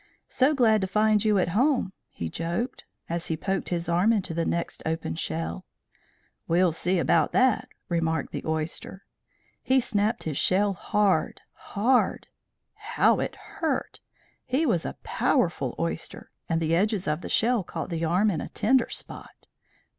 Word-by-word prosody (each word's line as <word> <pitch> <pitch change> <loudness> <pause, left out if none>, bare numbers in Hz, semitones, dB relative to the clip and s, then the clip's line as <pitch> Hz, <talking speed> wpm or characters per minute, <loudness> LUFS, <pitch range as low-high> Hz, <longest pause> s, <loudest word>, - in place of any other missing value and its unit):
"So 275 +4 +2
glad 220 -5 +4
to 190 - -1
find 215 +1 +2
you 215 -2 +3
at 180 -2 +1
home," 245 - +1 0.2
he 85 - -5
joked, 170 - -3 0.2
as 170 0 -3
he 160 - -1
poked 195 +2 -2
his 170 -1 -2
arm 175 +6 +3
into 195 -6 0
the 165 0 -1
next 170 0 -2
open 160 - -2
shell. 80 +1 -4 0.8
"We'll 175 +1 +3
see 180 +3 0
about 170 0 +2
that," 255 -2 +3 0.2
remarked 165 -2 -1
the - - -4
oyster. 160 +4 -4 0.6
He 265 +1 +3
snapped 220 -2 0
his 155 -4 -2
shell 200 +2 +2
hard, 200 -3 0
hard. 245 +5 0 0.4
How - - +2
it - - -3
hurt! - - -3 0.4
He 265 +5 0
was 180 - +1
a - - -7
powerful - - 0
oyster, - - -4 0.2
and 165 - +1
the 165 0 0
edges 200 +1 0
of 150 +2 -1
the - - -7
shell 235 -2 +2
caught - - -5
the 165 0 -2
arm 185 +6 +2
in 160 -5 -2
a - - -6
tender 235 +3 +2
spot. - - -9
185 Hz, 160 wpm, -26 LUFS, 165-220 Hz, 0.8 s, glad